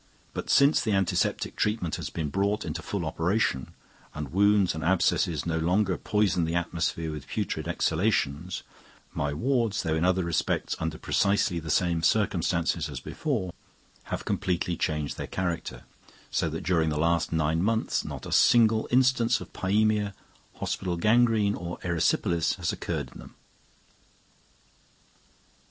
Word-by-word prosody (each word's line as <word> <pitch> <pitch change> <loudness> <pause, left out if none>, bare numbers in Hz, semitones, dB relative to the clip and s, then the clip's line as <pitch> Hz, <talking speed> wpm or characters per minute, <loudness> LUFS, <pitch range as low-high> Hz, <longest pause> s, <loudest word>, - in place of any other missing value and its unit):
But - - -5
since 140 +2 +5
the 110 - 0
antiseptic 95 -2 0
treatment 105 -6 -1
has - - -5
been 80 -3 -3
brought 100 +5 0
into 80 +1 -4
full 95 +1 -3
operation, 80 - -1 0.4
and 75 -3 -5
wounds 100 -1 +4
and 80 -1 -5
abscesses 85 -2 +1
no 80 -1 -1
longer 90 +3 +1
poison 105 -4 +1
the 80 +1 -1
atmosphere 85 -1 -1
with 75 -4 -7
putrid - - -3
exhalations, 85 -2 0 0.5
my 70 0 -1
wards, 115 - 0
though 80 -3 0
in 80 +1 0
other 95 0 +2
respects 85 -3 -1
under 80 -1 -3
precisely 100 -2 +1
the 80 -1 -8
same 85 +1 +1
circumstances 85 -4 +1
as 70 -4 -5
before, 105 - -3 0.5
have - - -4
completely 90 -1 -1
changed 75 -3 -2
their - - -4
character; 85 -3 -3 0.5
so - - 0
that - - -5
during 80 -4 +2
the 75 - -2
last 85 +1 +1
nine 80 0 +1
months 110 +3 0
not - - -7
a - - -7
single 110 -2 +4
instance 125 -1 +3
of - - -11
pysemia, 105 +1 +1 0.4
hospital 90 -2 -3
gangrene, 110 +1 +3
or 85 -2 -5
erysipelas 85 -1 +1
has 85 -4 -2
occurred - - -4
in - - -12
them. - - -13
90 Hz, 145 wpm, -27 LUFS, 80-105 Hz, 0.5 s, since